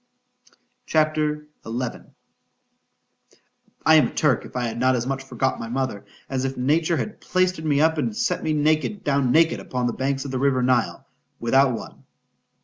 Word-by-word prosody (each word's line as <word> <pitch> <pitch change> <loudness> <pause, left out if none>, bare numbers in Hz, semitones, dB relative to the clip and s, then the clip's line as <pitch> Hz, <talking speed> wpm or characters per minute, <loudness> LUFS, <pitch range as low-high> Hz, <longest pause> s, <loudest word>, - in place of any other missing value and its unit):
C - - -1
H 155 - +7
A - - -7
P. 155 - -2
XI 150 -6 -4 1.9
I 160 - +7
AM 140 -6 +4
a - - -7
Turk 140 -6 +2
if - - -13
I 125 - -1
had 115 -1 -3
not 130 +1 +3
as 120 -1 -1
much 135 0 -2
forgot 135 0 -2
my 115 - -5
mother, 125 -5 -3 0.2
as 130 -1 -2
if 135 0 -3
Nature 155 +6 +1
had 215 - -5
plaistered 185 -3 0
me 145 -2 +2
up, 160 0 +3
and 215 +6 -2
set 235 0 0
me 155 - -1 0.5
down 140 -3 +1
naked 165 +3 +4
upon 125 -1 -3
the 120 - 0
banks 135 +1 -2
of 140 - -5
the 130 - -2
river 130 -2 +2
Nile, 125 -2 +1 0.3
without 130 +3 +3
one. - - -11
135 Hz, 185 wpm, -23 LUFS, 125-155 Hz, 1.9 s, H